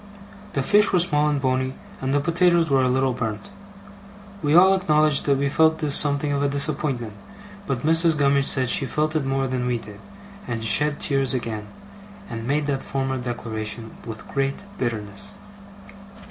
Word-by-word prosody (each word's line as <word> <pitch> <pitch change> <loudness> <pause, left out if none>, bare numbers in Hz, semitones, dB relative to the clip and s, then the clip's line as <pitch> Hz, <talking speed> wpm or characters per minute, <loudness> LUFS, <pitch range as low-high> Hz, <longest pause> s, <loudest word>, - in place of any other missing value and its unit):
The 135 - -1
fish 210 +8 +4
were 185 - +3
small 150 -4 +2
and 145 -1 0
bony, 130 0 -1 0.3
and 135 0 -2
the 145 - +2
potatoes 170 +1 +2
were 135 -1 +4
a 130 - +2
little 130 0 +1
burnt. 110 -4 -5 0.9
We 150 0 +1
all 190 +2 +7
acknowledged 155 -5 +2
that 140 -1 +2
we 140 +1 0
felt 160 +2 +3
this 150 -3 -2
something 145 0 +4
of 140 0 -1
a 145 - +1
disappointment; 140 -5 -2 0.5
but 135 -2 -3
Mrs. 165 0 +3
Gummidge 140 -1 +2
said 130 -2 +3
she 135 - +2
felt 155 +3 -1
it 150 -3 0
more 135 0 -1
than 125 -1 -2
we 125 -1 0
did, 105 -2 -11 0.5
and 115 -2 -4
shed 150 +8 +4
tears 135 -1 +1
again, 110 -4 -4 0.6
and 115 0 -6
made 145 +2 0
that 140 -2 -2
former 135 -1 -3
declaration 115 -2 -5
with 110 -2 -9
great 135 +6 -2 0.2
bitterness. 105 -4 -3
135 Hz, 175 wpm, -23 LUFS, 125-150 Hz, 0.9 s, all